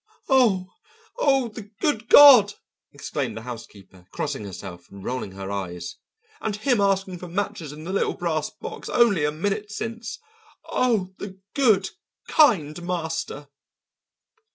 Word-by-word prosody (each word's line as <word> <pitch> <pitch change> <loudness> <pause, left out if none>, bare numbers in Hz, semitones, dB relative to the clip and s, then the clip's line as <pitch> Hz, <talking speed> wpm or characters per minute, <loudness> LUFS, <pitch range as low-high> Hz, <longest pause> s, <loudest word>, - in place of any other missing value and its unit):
"Oh, 215 -9 +3 0.5
oh, 270 - +2
the 210 -1 -10
good 240 -6 -1
God!" 250 -9 +9 0.4
exclaimed 110 - -4
the 110 - -7
housekeeper, 105 -6 -11
crossing 140 -8 -4
herself 90 -2 -9
and 100 -1 -12
rolling 125 -5 -4
her 95 0 -6
eyes. 90 -3 -5 0.4
"And 215 - -2
him 235 0 +1
asking 195 -2 0
for 180 - -8
matches 170 -4 -3
in 150 +1 -10
the 185 +4 -5
little 200 - 0
brass 155 -3 -2
box - - -8
only 205 -11 +3
a 150 - +1
minute 205 +6 -3
since. 225 +1 -5 0.5
Oh, 215 -7 0
the 190 -2 -7 0.2
good, 215 -9 +3 0.4
kind 175 - +3
master!" 160 -4 -4
185 Hz, 135 wpm, -24 LUFS, 140-215 Hz, 0.5 s, God